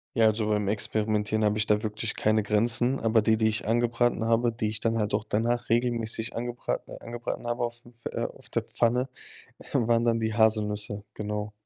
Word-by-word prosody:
Ja, 115 - +4
also, 110 0 +1
beim 105 -1 +1
Experimentieren 105 +1 0
habe 105 0 +2
ich 105 - +1
da 105 +1 +2
wirklich 110 +1 -3
keine 110 0 +2
Grenzen, 115 +5 +2
aber 110 0 +3
die, 110 +1 +3
die 110 0 +2
ich 110 0 0
angebraten 120 +1 +1
habe, 115 +1 +3
die 110 -1 -2
ich 105 0 -2
dann 115 0 +1
halt 105 -1 -1
auch 105 - +1
danach 120 +3 -1
regelmäßig 115 -1 +1
angebraten 120 +1 -4
angebraten 120 0 -5
habe 120 +1 -1
aufm 120 0 -6 0.2
äh, - - -2
auf - - -10
der - - -1
Pfanne, 125 +2 +1 0.6
waren 115 0 +2
dann 115 -1 +2
die 110 -1 -1
Haselnüsse, 105 -2 +1
genau. 105 0 -4
110 Hz, 185 wpm, -27 LUFS, 105-120 Hz, 0.6 s, Ja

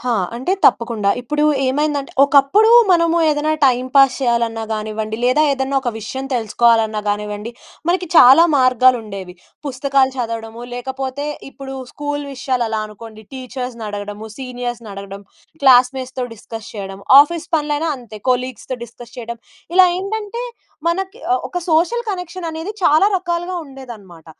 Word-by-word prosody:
హా! 250 0 -1 0.2
అంటే 260 +10 -1
తప్పకుండా. 225 -4 +3
ఇప్పుడు 300 +5 -1 0.2
ఏమైందంటే, 285 +1 -1
ఒకప్పుడు 285 +10 +4 0.2
మనము 335 -1 +3
ఏదైనా 300 +1 +1
టైమ్ 255 -1 +2
పాస్ 270 -2 +6
చేయాలన్నా 235 -2 0
గానివ్వండి 215 0 -4
లేదా 255 +5 +3
ఏదైనా 270 0 -2
ఒక 245 - -1
విషయం 260 +5 -6
తెలుసుకోవాలన్నా 225 -1 +2
కానివ్వండి. 210 +1 -3 0.4
మనకి 360 +1 +1
చాలా 270 +4 +8
మార్గాలు 255 -1 +4
ఉండేవి 195 -4 -8 0.3
పుస్తకాలు 270 0 +1
చదవడము, 230 -1 -5
లేకపోతే 265 +2 -4 0.3
ఇప్పుడు 270 -1 -9 0.2
స్కూల్ 290 0 -4
విషయాలు 255 -2 -1
అలా 220 -1 -2
అనుకోండి 220 +1 -12
టీచర్స్‌నడగడము, 220 -5 -6
సీనియర్స్‌నడగడం, 230 -6 -7 0.4
క్లాస్మేట్స్‌తో 255 0 +3
డిస్కస్ 225 0 -9
చేయడం, 195 -2 -7 0.2
ఆఫీస్ 330 +2 0
పనులు 295 -1 -1
అయినా 325 +1 -1
అంతే 225 -3 -11
కొలీగ్స్‌తో 255 0 -2
డిస్కస్ 240 +1 -14
చేయడం. 235 0 -6 0.4
ఇలా 370 -1 +8
ఏంటంటే 435 +4 -4 0.4
మనకి 385 +5 -2
ఆహ్, 250 - +1
ఒక 355 - -2
సోషల్ 445 +10 +1
కనెక్షన్ 360 -1 -6
అనేది 325 +5 -5
చాలా 310 +7 +5
రకాలుగా 350 0 -3
ఉండేదనమాట. 220 - -12
255 Hz, 130 wpm, -18 LUFS, 225-295 Hz, 0.4 s, చాలా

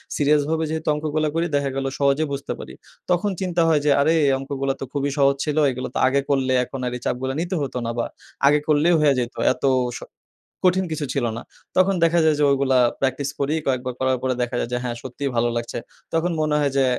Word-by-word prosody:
সিরিয়াসভাবে 150 +2 +2
যেহেতু 160 0 -4
অঙ্কগুলা 155 +1 -1
করি 165 +1 +1
দেখা 140 -1 +1
গেলো 135 0 -1
সহজে 140 +2 +3
বুঝতে 140 - -4
পারি। - - -9 0.4
তখন 180 +4 +2
চিন্তা 175 -2 0
হয় 155 -3 +3
যে 150 - +4
আরে 155 +3 +3
এ - - +3
অঙ্কগুলা 135 0 -2
তো - - -2
খুবই 145 0 0
সহজ 140 -1 +4
ছিল। 150 -1 -2
এগুলা 130 0 -5
তো - - 0
আগে 140 +1 +2
করলে 135 -2 +1
এখন 135 +2 -7
আর 125 - -1
এই - - -15
চাপগুলা 130 +2 -1
নিতে 175 +2 -2
হতো 135 -3 -3
না। 115 - -1
বা 120 - 0 0.4
আগে 145 +1 +5
করলেই 155 +3 +4
হইয়া 150 -2 +4
যেত। 120 0 -3 0.2
এত - - -18 0.3
স - - -8 0.7
কঠিন 185 +1 +3
কিছু 155 -1 -2
ছিল 140 - 0
না। 120 - -6 0.3
তখন 185 +1 +4
দেখা 165 +1 +3
যায় 155 -1 +4
যে - - +1
ওইগুলা 135 -1 +2 0.2
প্র্যাকটিস 135 +1 0
করি। 140 +2 +1
কয়েকবার 130 -1 -1
করার 130 -1 +1
পরে 130 -1 0
দেখা 120 0 -2
যায় - - -2
যে - - +1
হ্যাঁ, 120 -1 -3
সত্যিই 135 +2 -4
ভালো 120 +1 +2
লাগছে। 120 0 -3 0.4
তখন 165 +2 +1
মনে 155 -1 +1
হয় 145 -1 +1
যে, 135 - +4
140 Hz, 225 wpm, -22 LUFS, 130-155 Hz, 0.7 s, আগে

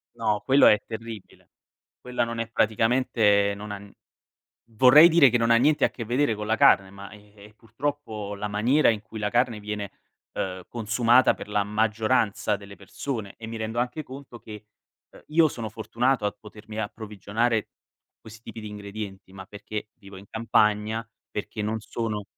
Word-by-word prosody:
No, 105 -2 0
quello 135 +1 +6
è 105 - +6
terribile, 110 -2 -9 0.5
quella 125 -1 -2
non 115 0 -4
è 115 - -2
praticamente 110 -2 +2
non 105 +1 -8
ha 100 -1 -6 0.9
vorrei 130 +8 +8
dire 160 -5 +6
che 120 - +2
non 115 0 +1
ha 115 - +6
niente 145 +5 +3
a - - +2
che 115 - -7
vedere 125 +1 +1
con 105 0 -6
la 110 - +1
carne, 95 -2 +5
ma 100 +1 -11
e 105 0 -17
e 105 - -15
purtroppo 110 -3 -5
la 105 +1 -4
maniera 120 +9 +2
in 110 -2 +1
cui 110 - -10
la 105 - -1
carne 120 -1 0
viene, 105 -1 -5 0.4
uhm, 95 -1 -4
consumata 120 +2 +3
per - - -10
la 105 0 +1
maggioranza 110 0 0
delle 100 0 -12
persone 105 +1 -6
e 115 - -9
mi 115 0 -6
rendo 110 +1 -4
anche 125 +5 -3
conto 135 -3 -11
che, 105 -2 -11 0.5
uhm, - - -16
io 160 +1 +4
sono 115 -5 -6
fortunato 115 +2 -1
a 105 - 0
potermi 105 0 -12
approvvigionare 110 +1 -2 0.5
questi 110 0 -14
tipi 115 -1 -9
di 105 - -7
ingredienti, 100 -2 -8
ma 95 - -9
perché 105 +2 -7
vivo 100 -2 -13
in 95 - -12
campagna, 110 0 +1 0.2
perché 105 +1 -5
non 110 +1 -2
sono 110 -1 -4
110 Hz, 175 wpm, -25 LUFS, 105-115 Hz, 0.9 s, vorrei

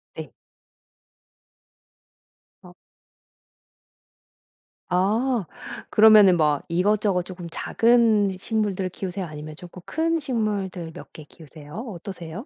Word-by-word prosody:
네. - - -8 2.3
어. 180 0 -14 2.1
어. 210 +5 +1 0.4
그러면은 210 -4 +7
뭐 150 -2 +2
이것저것 195 +1 +1
쪼금 175 -1 -9
작은 225 -4 +2
식물들을 200 -2 -2
키우세요 185 +1 -5
아니면 155 -1 -9
쪼끔 180 +2 -12
큰 330 +1 0
식물들 205 - -3
몇 - - -12
개 155 - -11
키우세요? 150 -1 -14
어떠세요? 190 - -7
190 Hz, 205 characters per minute, -24 LUFS, 175-215 Hz, 2.3 s, 그러면은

